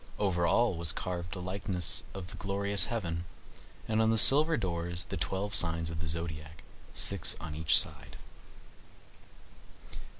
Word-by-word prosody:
Over 90 -4 0
all 115 0 +2
was 85 -1 0
carved 90 -1 -5
the 90 - -5
likeness 95 -1 -2
of 90 -2 -7
the - - -9
glorious 100 +1 0
heaven; 85 -7 -4 0.6
and 110 0 +1
on 110 - +2
the 115 - +2
silver 150 +7 +7
doors 85 -2 -4
the - - -4
twelve 100 +2 -3
signs 85 -1 +2
of 80 - -5
the 80 - -5
zodiac, 80 -1 -4 0.3
six 100 -5 +1
on 85 -2 -7
each 80 +1 +5
side. - - -1
90 Hz, 145 wpm, -30 LUFS, 85-100 Hz, 0.6 s, silver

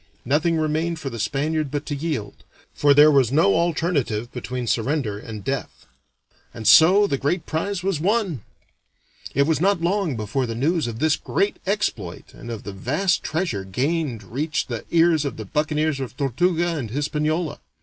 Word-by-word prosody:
Nothing 160 +6 +2
remained 160 +2 0
for 140 -4 -5
the 115 - -6
Spaniard 145 +6 -1
but 145 +1 -3
to 145 - -3
yield, 140 -9 -4 0.3
for 145 -1 +4
there 150 +1 +8
was 135 -5 +3
no 135 -9 +4
alternative 150 -9 0
between 125 0 -4
surrender 115 -2 -1
and 105 -2 -8
death. 135 +6 -4 0.7
And 110 -2 -4
so 175 - +7
the 140 -9 -1
great 155 +4 -1
prize 180 +3 -2
was 190 -5 0
won. 190 - 0 0.9
It 140 - +4
was 160 0 +1
not 195 0 +3
long 175 -3 0
before 115 +4 -2
the 115 - -4
news 155 +4 +1
of 115 -1 -5
this 155 +4 +2
great 200 - -1
exploit 200 +1 -2
and 120 - -10
of 115 -3 -6
the 100 - -7
vast 150 - 0
treasure 160 - -2
gained 130 - -2
reached 140 - -2
the 120 -2 -5
ears 165 -2 +3
of 140 -5 -4
the 110 - -6
buccaneers 150 +4 0
of 125 -2 -6
Tortuga 170 +5 +1
and 120 -7 -4
Hispaniola. 150 +5 -1
150 Hz, 170 wpm, -23 LUFS, 120-165 Hz, 0.9 s, there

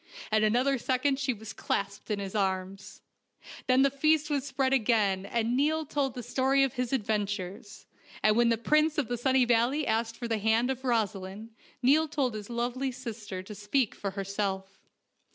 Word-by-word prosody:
In 215 0 +3
another 250 +5 +2
second 265 +2 0
she 275 -1 0
was 220 -2 -7
clasped 200 0 -3
in 210 - 0
his 195 -1 -5
arms. 190 -1 -3 0.7
Then 255 +1 +5
the 275 - +3
feast 305 +2 +2
was 285 -1 -1
spread 270 -1 0
again, 210 -6 +2
and 235 +2 0
Niall 310 +4 +1
told 275 -3 -1
the 245 - -5
story 270 +3 +2
of 270 - 0
his 250 -2 -2
adventures; 205 -3 -3 0.4
and 215 0 +4
when 235 0 +4
the 230 - +2
Prince 305 +6 +2
of 285 -6 0
the 245 - 0
Sunny 260 +1 +3
Valley 245 +5 +2
asked 225 0 -1
for 240 - -4
the 225 -2 -1
hand 225 +4 +2
of 260 0 -5
Rosaleen, 215 -3 -2 0.3
Niall 300 +5 +4
told 275 -5 -1
his 210 0 -7
lovely 245 +3 -2
sister 215 -6 -7
to 210 - -9
speak 210 +4 0
for 200 - -4
herself. 195 0 -3
235 Hz, 180 wpm, -29 LUFS, 210-270 Hz, 0.7 s, Then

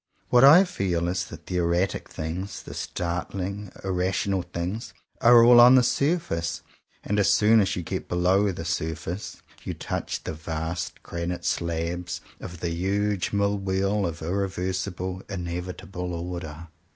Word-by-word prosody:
What 125 0 +5
I 155 +7 +9
feel 90 - -1
is 90 0 -1
that 80 -1 -11
the 90 - -3
erratic 85 +2 0
things, 90 +5 -5
the - - -9
snarling, 95 +3 -4
irrational 95 +1 0
things, 90 +6 -5 0.3
are 120 0 +8
all 120 0 +8
on 125 +2 +9
the 130 - +6
surface; 120 - 0 0.4
and 105 +1 0
as 100 - +3
soon 110 +1 +5
as 95 - 0
you 90 - -3
get - - -5
below 95 +3 +2
the 80 -2 -6
surface, 85 +2 -4 0.2
you - - -4
touch - - -4
the - - -4
vast 80 +2 -4
granite 85 +1 -4
slabs 85 +1 -2 0.2
of 85 -1 -9
the 85 - -1
huge 100 +3 0
Mill 100 0 +1
Wheel 95 +1 0
of 85 -1 -6
irreversible, 95 0 -2
in 95 -3 -4
evitable 90 +1 -5
Order. 85 -2 -6
90 Hz, 150 wpm, -26 LUFS, 85-100 Hz, 0.4 s, I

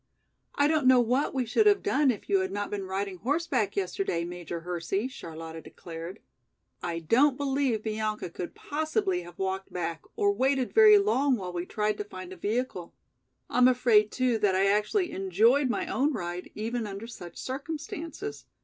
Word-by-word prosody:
"I 285 - +4
don't 305 -4 +2
know 255 -1 +7
what 250 +4 +1
we 260 -2 -1
should 420 - +3
have 410 -1 +4
done 280 +1 +3
if 225 -6 -2
you 195 - +3
had 190 0 -2
not 205 0 -3
been 200 -2 -3
riding 190 0 -3
horseback 260 - 0
yesterday, 185 -3 -1
Major 175 -1 -6
Hersey," 180 +5 -2
Charlotta 165 -8 -8
declared. 170 +5 -9 0.6
"I 170 -1 -3
don't 250 - +3
believe 270 -5 0
Bianca 215 -4 -2
could 175 0 -6
possibly 235 -12 -1
have 175 0 -12
walked 190 0 -3
back, 170 -2 -3
or 405 -2 +2
waited 265 -6 +1
very 430 -1 +8
long 285 -10 +2
while 185 -5 -5
we 175 0 -4
tried 210 0 -1
to - - -1
find 185 -2 -9
a - - -9
vehicle. 205 -2 -3 0.5
I'm 250 0 +4
afraid 235 -4 +4
too 250 -3 +1
that 200 -3 +2
I 190 +1 +3
actually 210 - +1
enjoyed 225 +9 +3
my - - -1
own 290 +3 +1
ride 175 -4 -5
even 225 +1 -3
under 200 +2 -6
such 175 -7 -10
circumstances. 315 +8 -6
215 Hz, 175 wpm, -28 LUFS, 185-270 Hz, 0.6 s, very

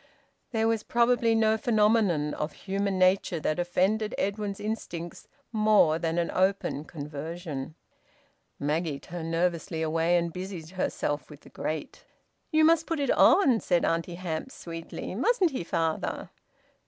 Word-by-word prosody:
There 225 -2 +1
was 225 -1 +1
probably 235 -1 +2
no 220 0 +3
phenomenon 210 -9 +2
of 150 - -3
human 195 0 -2
nature 185 -2 +3
that 155 +3 -1
offended 195 +5 +1
Edwin's 200 0 -2
instincts 175 -6 -5 0.2
more 215 -8 +4
than 165 0 -1
an 170 -1 0
open 190 -5 0
conversion. 150 -1 -6 0.8
Maggie 150 0 -1
turned 165 -1 -6
nervously 165 -1 -1
away 165 +2 +2
and 170 -1 -1
busied 180 -3 -6
herself 145 -6 -2
with 150 -1 -12
the - - -16
grate. 155 -1 -5 0.5
"You 315 -1 +4
must 325 0 +4
put 330 -2 -1
it 280 -3 +1
on," 265 - +5
said 175 -4 +1
Auntie 170 +1 -1
Hamps 175 +7 -5
sweetly. 165 +1 -7
"Mustn't 375 - +2
he, 255 - -3
father?" 165 -1 -2
180 Hz, 140 wpm, -28 LUFS, 165-215 Hz, 0.8 s, on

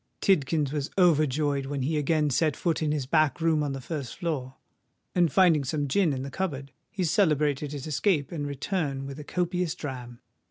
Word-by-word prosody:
Tidkins 150 -5 +2
was 145 -2 -2
overjoyed 150 -5 +2
when 140 -1 -2
he 155 +4 0
again 150 0 +1
set 155 +1 +2
foot 165 -2 -1
in 155 -1 +1
his 150 -3 -1
back 155 +2 +2
room 160 -2 +2
on 145 -2 -1
the 135 - -4
first 140 -3 -5
floor: 135 -6 -3 0.6
and 175 -3 +3
finding 170 -6 +4
some 145 +2 -1
gin 175 +3 +2
in 130 -1 -3
the 140 - -6
cupboard, 140 -7 -3 0.2
he 200 -5 -3
celebrated 150 -6 +2
his 145 -3 -6
escape 155 -1 0
and 150 -4 -3
return 140 -1 -2
with 140 +1 -7
a - - -6
copious 180 +1 -1
dram. 125 -4 -7
150 Hz, 190 wpm, -27 LUFS, 140-165 Hz, 0.6 s, finding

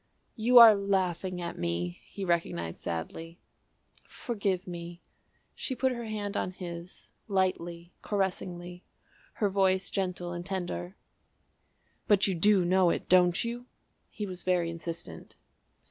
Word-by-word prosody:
"You 245 +2 +4
are 230 -2 +11
laughing 190 -2 -1
at 170 - -5
me," 85 +1 -2
he 195 - -6
recognised 125 - -1
sadly. 165 - -5 0.7
"Forgive 200 -6 -3
me." 175 -1 -7 0.5
She 260 - -4
put 260 +2 +1
her 235 -2 -4
hand 210 -2 -4
on - - -1
his, 175 -1 -9 0.2
lightly, 175 -3 -1
caressingly, 180 -3 -3 0.5
her 205 - 0
voice 190 -1 +2
gentle 180 -2 -2
and 175 0 -5
tender. 180 0 -4 1.1
"But 205 -1 +5
you 195 - +2
do 190 +1 +4
know 185 0 +4
it, - - -2
don't 180 +2 +5
you?" 240 +1 -5 0.4
He 210 - -5
was 185 -2 -5
very 175 -2 +1
insistent. 165 - -7
185 Hz, 130 wpm, -29 LUFS, 170-200 Hz, 1.1 s, are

